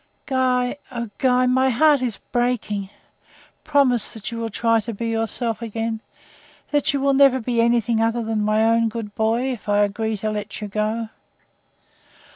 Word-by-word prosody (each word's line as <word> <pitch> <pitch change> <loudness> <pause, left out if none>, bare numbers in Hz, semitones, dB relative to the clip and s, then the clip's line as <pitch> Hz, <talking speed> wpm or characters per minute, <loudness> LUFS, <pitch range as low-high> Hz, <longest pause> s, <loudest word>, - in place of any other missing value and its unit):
"Guy 255 -1 +1
oh, 235 -3 -5
Guy, 255 -1 +3
my 260 +1 +3
heart 285 +3 +4
is 240 -5 -2
breaking! 240 -5 -1 0.7
Promise 270 -7 +2
that 220 +1 -6
you 230 - -5
will 230 0 -3
try 230 +1 +2
to 225 0 -5
be 230 +2 -3
yourself 225 0 -2
again 225 0 -3 0.7
that 290 -1 +2
you 280 - -1
will 275 0 +2
never 270 -1 +5
be 235 0 0
anything 235 -1 +2
other 230 +1 +1
than 220 -1 -1
my 215 +1 +2
own 230 0 +3
good 220 -2 -6
boy, 230 +5 0
if 215 -3 -9
I 205 0 +4
agree 220 +2 -1
to 215 +2 -2
let 210 0 -5
you 210 - -5
go?" 215 +2 -2
230 Hz, 170 wpm, -22 LUFS, 220-250 Hz, 0.7 s, never